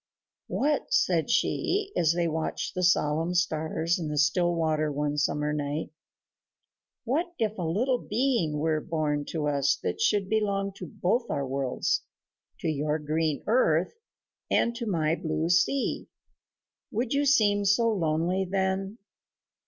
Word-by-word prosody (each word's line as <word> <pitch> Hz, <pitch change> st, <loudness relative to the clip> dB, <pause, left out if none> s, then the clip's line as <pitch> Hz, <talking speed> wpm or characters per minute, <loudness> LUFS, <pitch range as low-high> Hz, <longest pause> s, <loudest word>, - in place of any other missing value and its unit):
"What," 295 Hz, -, 0 dB
said 470 Hz, -2 st, +2 dB
she, 405 Hz, 0 st, 0 dB
as 165 Hz, -1 st, +3 dB
they 170 Hz, 0 st, 0 dB
watched 160 Hz, 0 st, -3 dB
the 185 Hz, -, -2 dB
solemn 165 Hz, -1 st, +2 dB
stars 160 Hz, 0 st, 0 dB
in 160 Hz, -, -3 dB
the 150 Hz, 0 st, -3 dB
still 170 Hz, +4 st, +2 dB
water 155 Hz, -2 st, 0 dB
one 145 Hz, +1 st, -1 dB
summer 150 Hz, 0 st, 0 dB
night, 145 Hz, +1 st, -3 dB, 1.1 s
"what 285 Hz, +9 st, 0 dB
if 220 Hz, -2 st, -1 dB
a -, -, -2 dB
little 230 Hz, +10 st, 0 dB
being 220 Hz, -, 0 dB
were 155 Hz, 0 st, 0 dB
born 150 Hz, -3 st, -1 dB
to 155 Hz, -1 st, -3 dB
us 140 Hz, -1 st, +2 dB
that -, -, -2 dB
should 205 Hz, -, +2 dB
belong 200 Hz, -2 st, 0 dB
to 180 Hz, -, -7 dB
both 230 Hz, -, -1 dB
our 140 Hz, -, -1 dB
worlds, 135 Hz, -1 st, -1 dB, 0.6 s
to -, -, -2 dB
your 150 Hz, 0 st, 0 dB
green 155 Hz, 0 st, -1 dB
earth 185 Hz, -8 st, +2 dB, 0.6 s
and 235 Hz, 0 st, +2 dB
to 235 Hz, -2 st, -4 dB
my 160 Hz, -5 st, +1 dB
blue 160 Hz, 0 st, -2 dB
sea? 180 Hz, +10 st, +1 dB, 0.8 s
Would 235 Hz, +4 st, -2 dB
you 280 Hz, +1 st, +2 dB
seem 205 Hz, -7 st, +4 dB
so 225 Hz, +4 st, +3 dB
lonely 170 Hz, 0 st, 0 dB
then? 190 Hz, +2 st, -1 dB
170 Hz, 145 wpm, -27 LUFS, 155-210 Hz, 1.1 s, seem